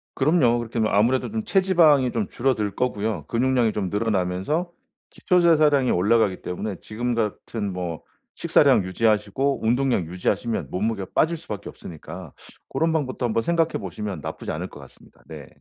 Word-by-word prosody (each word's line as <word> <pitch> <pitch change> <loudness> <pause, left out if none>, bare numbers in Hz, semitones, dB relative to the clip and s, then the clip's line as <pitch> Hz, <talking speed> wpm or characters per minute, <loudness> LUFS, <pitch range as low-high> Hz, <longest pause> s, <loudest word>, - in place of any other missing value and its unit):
그럼요. 135 -4 +3
그렇게 115 0 -4
뭐 110 -1 +1
아무래도 120 - +2
좀 220 0 -2
체지방이 170 - +4
좀 110 -4 -2
줄어들 110 -6 -1
거고요 110 -3 -2
근육량이 125 -1 +2
좀 95 -3 -2
늘어나면서 105 - -1 0.4
기초대사량이 155 -7 +3
올라가기 100 0 +2
때문에 95 +2 -4
지금 120 +3 -3
같은 105 -1 -3
뭐 90 -3 -4 0.3
식사량 - - +4
유지하시고 110 +7 0
운동량 125 -4 +1
유지하시면 90 +7 -2
몸무게가 100 0 -2
빠질 165 +2 +2
수밖에 105 - -7
없으니까 85 0 -10 0.3
고런 165 0 0
방법도 135 -5 -1
한번 115 -1 +1
생각해 165 +4 0
보시면 100 -1 -5
나쁘지 - - -5
않을 - - -4
것 - - -13
같습니다. - - -18
네. - - -10
115 Hz, 400 characters per minute, -24 LUFS, 100-135 Hz, 0.4 s, 체지방이